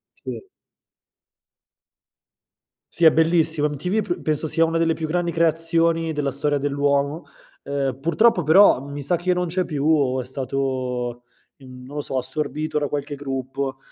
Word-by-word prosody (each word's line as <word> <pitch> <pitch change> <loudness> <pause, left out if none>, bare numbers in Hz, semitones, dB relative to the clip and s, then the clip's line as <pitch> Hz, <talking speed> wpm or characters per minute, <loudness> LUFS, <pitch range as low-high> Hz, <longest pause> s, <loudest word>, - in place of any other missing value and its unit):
Sì. - - -7 2.5
Sì 170 - +1
è 160 - +9
bellissimo, 160 -1 +2
MTV 180 +9 -1
pr 350 - -4
penso 155 0 0
sia 165 +2 +3
una 165 0 -1
delle 165 -1 +2
più 160 - -4
grandi 175 +1 -1
creazioni 165 0 +2
della 145 -3 -2
storia 145 +2 +1
dell'uomo, 140 +2 0 0.4
ehm, 135 -2 -3
purtroppo 180 +7 +3
però 160 -2 +5
mi 140 0 -6
sa 160 +6 +2
che 175 +2 -1
non 180 0 0
c'è 180 +2 -1
più 150 -5 -3
o 140 -5 +2
è - - -9
stato, 130 -2 -3 0.4
mhmm, 130 -2 -13
non 145 +3 -9
lo - - -1
so, 135 - -4
assorbito 150 +3 -2
da 145 - -1
qualche 145 +1 -4
gruppo; 135 -1 -4
150 Hz, 155 wpm, -22 LUFS, 135-165 Hz, 2.5 s, è